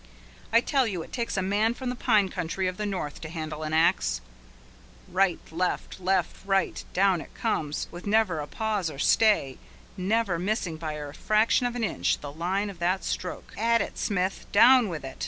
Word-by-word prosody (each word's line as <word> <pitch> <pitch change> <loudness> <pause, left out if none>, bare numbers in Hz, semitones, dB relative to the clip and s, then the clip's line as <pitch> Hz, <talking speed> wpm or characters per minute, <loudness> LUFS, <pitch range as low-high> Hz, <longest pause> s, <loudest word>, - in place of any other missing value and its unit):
I 230 +1 +6
tell 265 -1 +1
you 180 -6 -3
it - - -15
takes 235 -4 -2
a 190 - +1
man 210 +4 +1
from 255 -1 -4
the - - -4
pine 215 -6 +3
country 180 +2 -3
of 180 0 -3
the 210 - -2
north 180 -7 -4
to 155 - -6
handle 155 -2 -5
an 155 0 -3
axe! 60 - +2 0.9
Right, 185 -1 +2
left, 180 +3 -2
left, 185 -1 0
right, 195 -1 0
down 190 -3 +3
it - - -12
comes, 155 -10 -2
with 175 +3 -9
never 205 -6 +2
a 145 - -4
pause 210 -5 -1
or 145 - -9
stay, 150 - +3 0.4
never 195 -1 0
missing 185 -3 -1
by 155 -1 -4
a 145 -1 -6
fraction 215 - +2
of 245 - -5
an 240 - -2
inch 215 - 0
the 145 - -7
line 190 +6 -1
of 180 - -15
the 180 +2 +2
stroke! 180 - -5
At 230 +2 +2
it, - - -3
Smith! 190 -3 -1
Down 240 +1 +6
with 160 -5 -5
it! 135 - -9
190 Hz, 195 wpm, -27 LUFS, 165-215 Hz, 0.9 s, I